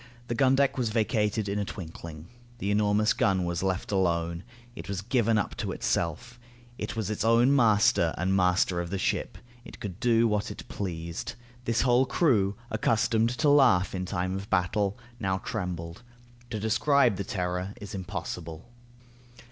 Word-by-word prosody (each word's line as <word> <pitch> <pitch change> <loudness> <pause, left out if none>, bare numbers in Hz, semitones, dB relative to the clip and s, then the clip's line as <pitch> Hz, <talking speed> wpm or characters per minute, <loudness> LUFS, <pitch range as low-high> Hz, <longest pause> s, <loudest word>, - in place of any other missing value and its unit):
The - - 0
gun 130 +1 +3
deck 140 -1 +2
was 120 -3 0
vacated 110 -1 0
in 100 +1 -1
a - - 0
twinkling. 85 -4 -8 0.3
The 100 -4 -2
enormous 105 +1 +3
gun 95 -2 +1
was 85 0 -2
left 95 0 -2
alone. 85 -3 0 0.3
It - - -9
was 95 -1 -3
given 115 -1 +2
up 105 - -1
to - - -3
itself. 115 +10 -2 0.4
It - - -4
was 110 -2 -2
its 105 - -2
own 120 +4 +4
master 105 -8 +4
and 95 +2 +1
master 90 -1 +2
of 85 - -5
the 100 - -2
ship. 95 - -1 0.3
It - - -12
could 100 -5 -6
do 115 -1 +3
what 105 -1 -1
it - - -9
pleased. 85 -4 -5 0.3
This 115 -1 +1
whole 125 +1 +3
crew, 110 - +2 0.2
accustomed 115 +1 +2
to 150 - +3
laugh 125 -11 +4
in 95 -1 -3
time 90 +2 -2
of 100 +1 -6
battle, 100 +2 +1 0.2
now 95 -3 0
trembled. 90 -3 -5 0.5
To 110 - -3
describe 120 +1 +3
the 100 - -2
terror 90 +1 -3
is 105 +2 -8
impossible. 90 -1 -6
100 Hz, 165 wpm, -28 LUFS, 90-115 Hz, 0.5 s, own